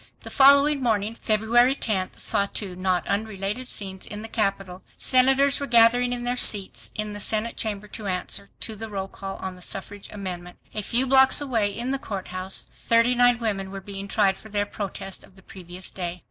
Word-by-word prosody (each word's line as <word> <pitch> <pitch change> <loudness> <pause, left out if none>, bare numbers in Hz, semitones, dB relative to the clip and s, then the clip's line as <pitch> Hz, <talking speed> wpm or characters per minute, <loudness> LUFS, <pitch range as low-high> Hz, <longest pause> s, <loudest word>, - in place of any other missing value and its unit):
The - - -9
following 280 +1 +6
morning, 220 -2 0
February 235 +4 +3
10th, 195 -8 -2
saw 200 -2 +1
two 195 -3 -4
not 185 -1 0
unrelated 210 +3 -3
scenes 190 -4 -3
in 210 +1 -7
the - - -6
capital. 195 -4 -2 0.2
Senators 270 +2 +3
were 280 - -4
gathering 240 +1 +5
in 245 -1 -3
their 245 +1 -1
seats 205 -5 +1
in 215 -1 -4
the 205 - -7
senate 220 +2 -1
chamber 210 -2 -3
to 210 0 -7
answer. 185 +2 -3
to 220 - -1
the 220 +1 -7
roll 195 -2 -4
call 195 0 -7
on 190 -1 -6
the 180 - -15
suffrage 195 +2 -6
amendment. 180 -3 -7 0.2
A 215 - -2
few 240 +5 +2
blocks 265 0 +6
away 235 -8 0
in 240 +6 -4
the 275 - -1
courthouse, 190 -4 -3 0.2
thirty 230 +2 +4
nine 245 -1 +4
women 200 -4 -2
were 195 0 -7
being 195 0 -8
tried 195 -2 +2
for 220 - -14
their 205 -1 -1
protest 195 -2 -6
of 190 - -19
the 190 - -18
previous 180 0 -7
day. 180 -1 -5
210 Hz, 195 wpm, -24 LUFS, 195-240 Hz, 0.2 s, following